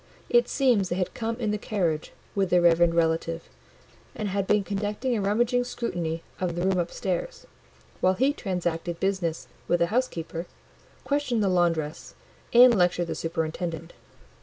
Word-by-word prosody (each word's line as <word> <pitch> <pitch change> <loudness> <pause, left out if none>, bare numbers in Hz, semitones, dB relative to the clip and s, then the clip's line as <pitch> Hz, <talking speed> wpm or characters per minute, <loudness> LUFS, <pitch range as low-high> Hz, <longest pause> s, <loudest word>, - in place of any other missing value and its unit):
It 480 0 +4
seems 240 -9 +2
they 175 - -1
had 185 -1 -2
come 230 0 -2
in 225 -3 -2
the 210 - -2
carriage 175 -8 -1 0.2
with 195 -2 0
their 180 0 +4
reverend 170 0 +4
relative, 165 0 0 0.7
and 210 -2 -3
had 195 0 -1
been 210 -1 +3
conducting 205 +6 -2
a 215 - -1
rummaging 240 +5 +2
scrutiny 175 -10 -3 0.2
of 180 -2 -1
the 175 - -2
room 190 -1 +2
upstairs, 190 - -3 0.5
while 185 +1 +3
he 265 +7 +2
transacted 175 - -3
business 190 -4 -1 0.2
with 175 - +3
the 170 - +4
housekeeper, 175 -9 -2 0.6
questioned 280 -6 0
the 195 - +2
laundress, 170 -4 0 0.4
and 245 +1 +8
lectured 180 -2 +2
the 165 - -3
superintendent. 165 0 -3
185 Hz, 155 wpm, -26 LUFS, 170-220 Hz, 0.7 s, and